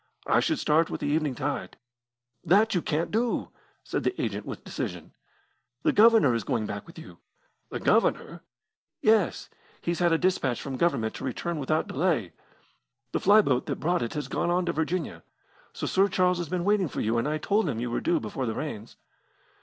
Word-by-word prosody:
I - - +3
should 315 - +1
start 160 - +2
with - - -5
the - - -2
evening 150 -2 0
tide." 140 +3 -4 0.7
"That 200 +6 +4
you 180 - +1
can't 160 +2 -1
do," 230 +2 0 0.3
said - - -3
the 375 - -1
agent - - -3
with - - -7
decision. - - -6 0.7
"The 315 - +4
Governor 220 - +6
is 115 -2 -1
going 110 +2 -1
back 100 +5 -6
with 170 - -14
you." 90 - -12 0.5
"The - - -4
Governor!" - - +1 0.6
"Yes. 215 -4 +2 0.3
He's 170 0 -2
had 175 -1 +3
a 165 - +4
dispatch 160 -9 0
from 135 -2 -5
Government 115 -10 +1
to - - -8
return 160 +5 -3
without 155 +3 0
delay. 140 - 0 0.8
The - - 0
fly 210 +3 +6
boat 130 -9 0
that - - -3
brought 175 +4 +1
it 120 +3 -3
has 150 - -3
gone - - -1
on 175 +1 +1
to 170 - -1
Virginia. 160 - -2 0.5
So - - -5
Sir 195 +1 +3
Charles 180 -2 +1
has 170 -4 -4
been 180 -1 -2
waiting 205 -3 +2
for - - -6
you, 115 +2 +1
as 115 - -1
I 155 +1 0
told 200 +3 +1
him 115 -5 -3
you 120 0 -3
were - - -1
due 335 0 +1
before 130 - -4
the 110 - -2
rains." 120 -8 -6
165 Hz, 200 wpm, -27 LUFS, 130-185 Hz, 0.8 s, Governor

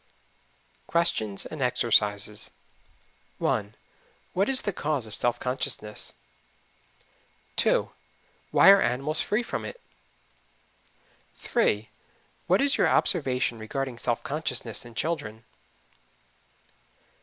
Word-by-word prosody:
QUESTIONS 110 -12 +1
AND 155 - -7
EXERCISES. 105 -4 +1 0.9
1. 105 0 -1 0.6
What 195 +5 +1
is 265 -1 +3
the 205 - -1
cause 150 -7 -1
of 110 - -10
self 120 +1 0
consciousness? 125 -4 -2 1.4
2. - - +2 0.6
Why 195 - +8
are 200 - +6
animals 145 +5 0
free 215 +4 0
from - - -4
it? - - -7 1.6
3. - - 0 0.6
What - - +4
is 280 0 +3
your - - +4
observation 130 - +1
regarding 125 +2 -4
self 120 -1 -1
consciousness 125 -7 -2
in 120 -1 -12
children? 115 -10 -3
125 Hz, 100 wpm, -27 LUFS, 110-160 Hz, 1.6 s, Why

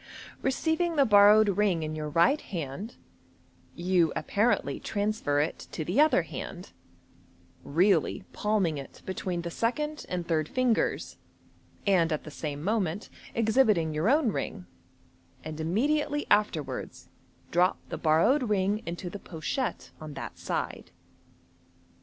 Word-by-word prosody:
Receiv 320 +5 0
ing 345 -2 0
the 280 -2 +5
borrowed 210 0 +7
ring 195 -4 +1
in 155 0 -3
your 155 -1 -4
right 170 - +3
hand, 175 - -6 0.8
you 175 -2 +2
apparently 210 +9 0
transfer 205 -8 -1
it 150 +3 -2
to 155 - -3
the 185 - +3
other 295 - +4
hand 160 - -7 0.9
(really 180 +3 +2
palmiLg 195 -8 0
it 135 - -11
between 185 -2 -3
the 170 - -4
second 300 - -2
and 180 -2 -3
third 155 -2 0
fingers, 255 -3 0 0.7
and 180 -5 +3
at 155 - -1
the 155 - -9
same 145 0 -5
moment 200 -2 -1 0.2
exhibiting 215 -8 +3
your 155 +8 +1
own 285 -4 +3
ring), 185 -2 -4 0.8
and 155 0 -6
im 160 +1 -2
mediately 295 +6 +1
afterwards 205 -8 0 0.4
drop 180 +2 +3
the - - -4
borrowed 215 - +3
ring 205 +1 +1
into 175 +2 -5
the 200 +3 -6
pochette 185 - -4
on 155 -2 -8
that - - -7
side. - - -4
190 Hz, 135 wpm, -28 LUFS, 160-225 Hz, 0.9 s, borrowed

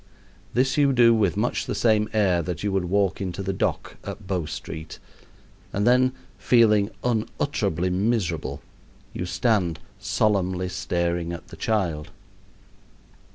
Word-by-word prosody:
This 135 +3 +2
you 140 -2 +4
do 120 -2 +6
with 100 -5 +1
much 120 +4 0
the - - -2
same 110 -2 +2
air 95 -5 +2
that 85 +1 -4
you 100 - 0
would 95 -2 0
walk 95 +1 +1
into 95 0 -3
the 95 +1 -1
dock - - -2
at 105 - -7
Bow 90 -5 -2
Street, 80 +1 -7 0.7
and 100 +1 0
then, 130 +1 +4 0.3
feeling 105 -4 +4
unutterably 95 -6 -1
miserable, 95 -4 -1 0.5
you 90 - -4
stand 95 -6 +1 0.2
solemnly 95 -3 0
staring 85 -2 -1
at 85 - -8
the - - -10
child. 85 -9 -1
95 Hz, 135 wpm, -25 LUFS, 90-110 Hz, 0.7 s, do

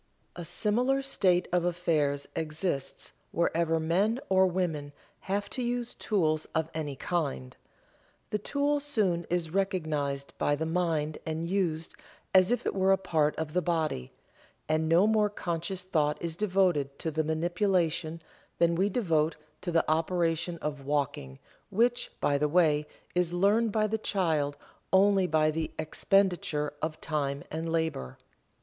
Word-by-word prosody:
A 175 - -6
similar 235 +10 +1
state 185 -9 +2
of 180 -1 +3
affairs 155 -5 0
exists 155 -2 -3 0.2
wherever 165 -1 +1
men 190 +9 +1
or 190 0 +5
women 165 -6 -2 0.3
have 200 +1 -2
to 255 - -3
use 240 0 -2
tools 155 -7 0
of 160 0 0
any 150 -3 -3
kind. 65 - -2 0.8
The 210 - 0
tool 285 +6 0
soon 210 - 0
is 170 -2 -1
recognized 155 -7 -1
by 145 - +2
the 160 +2 -2
mind 160 -3 0
and 160 +1 -3
used 170 -4 -1 0.4
as 185 +3 +6
if 245 - 0
it - - 0
were 190 0 +3
a 195 - +5
part 160 -5 +1
of 160 -1 -4
the 180 - +2
body, 155 - -1 0.6
and 155 +1 +1
no 170 +4 +5
more 215 -1 +3
conscious 180 -1 -3
thought 150 -5 0
is 170 -1 -3
devoted 180 -8 +1
to 160 - -3
the 155 +1 0
manipulation 165 0 0 0.3
than 170 0 +3
we 190 +4 +2
devote 165 -8 +1 0.3
to 175 - -3
the 165 -1 +2
operation 165 +1 0
of 145 -2 -3
walking, 135 - -2 0.3
which, 240 +4 +1
by 145 0 +2
the 150 0 +1
way, 150 -3 +3 0.3
is 180 -1 +1
learned 205 +5 +3
by 215 0 +2
the 220 +1 -1
child 160 -9 0 0.3
only 195 -1 +4
by 155 -2 +3
the 160 0 -2
expenditure 160 -2 +1
of 155 0 -3
time 140 -3 -2
and 160 +1 -3
labor. 160 - -2
170 Hz, 150 wpm, -29 LUFS, 155-190 Hz, 0.8 s, as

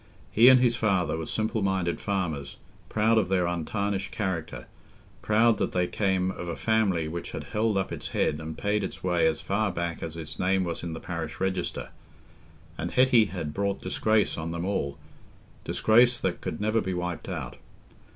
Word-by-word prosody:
He 115 +3 +6
and 130 -1 +8
his 120 -2 +3
father 95 -8 +1
were 80 0 -4
simple 110 0 -1
minded 95 -3 0
farmers, 85 -8 -2 0.3
proud 110 +1 +3
of 95 -4 -1
their 95 -2 +2
untarnished 95 +4 -2
character, 95 -6 -3 0.6
proud 110 0 +3
that - - -1
they 90 -1 +2
came 95 -1 0
of 90 - -7
a 85 - -3
family 100 -8 +1
which 85 +2 -5
had - - -4
held 105 -1 0
up 95 - -1
its - - -5
head 75 - 0
and 80 0 -6
paid 105 +1 0
its - - -6
way 90 -3 +3
as 80 - 0
far 100 +1 0
back 85 -1 -3
as 80 0 -5
its 80 -2 -7
name 95 +1 +2
was 85 -2 -4
in 85 -1 -4
the 80 - -6
parish 85 -2 -5
register; 90 -10 -2 0.9
and - - -2
Hetty 125 -3 +5
had 85 -7 -5
brought 100 +1 -1
disgrace 110 -5 +1
on 80 +1 -3
them 85 +1 -3
all—disgrace 110 - 0
that 95 -2 -1
could - - -4
never 110 +2 +1
be 95 -1 -2
wiped 90 -2 -4
out. - - -5
95 Hz, 180 wpm, -27 LUFS, 85-110 Hz, 0.9 s, and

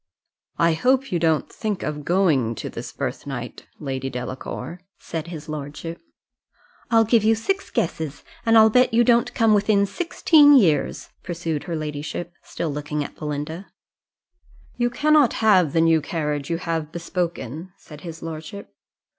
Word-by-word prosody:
"I 170 0 +3
hope 260 +9 +1
you 175 - +1
don't 160 -2 +1
think 210 -4 -3
of 150 -1 -4
going 150 -10 +2
to - - -6
this - - -7
birth - - -5
night, - - -6
lady 135 -2 -4
Delacour?" 130 +5 -6 0.2
said 165 0 -6
his 160 -3 -8
lordship. 155 +2 -6 0.9
"I'll 225 -1 +5
give 225 0 +3
you 220 +1 +4
six 390 - -2
guesses, 160 -3 -3 0.2
and 225 0 +4
I'll 220 0 +7
bet 250 0 +4
you 240 - +5
don't 235 0 +3
come 225 -2 +4
within 205 -1 +3
sixteen 300 - +4
years," 165 - +2
pursued 165 -4 -4
her 170 -3 -3
ladyship, 155 +3 -5
still 165 - -4
looking 150 +1 -3
at - - -9
Belinda. 150 +4 -5 1.1
"You 240 0 +1
cannot 295 +1 +3
have 190 -8 +4
the 165 - +2
new 165 -1 +4
carriage 150 -2 -3
you 165 - 0
have 165 -3 -3
bespoken," 170 -2 -4
said 150 -2 -13
his 165 -2 -8
lordship. 165 +4 -8
170 Hz, 155 wpm, -23 LUFS, 150-215 Hz, 1.1 s, I'll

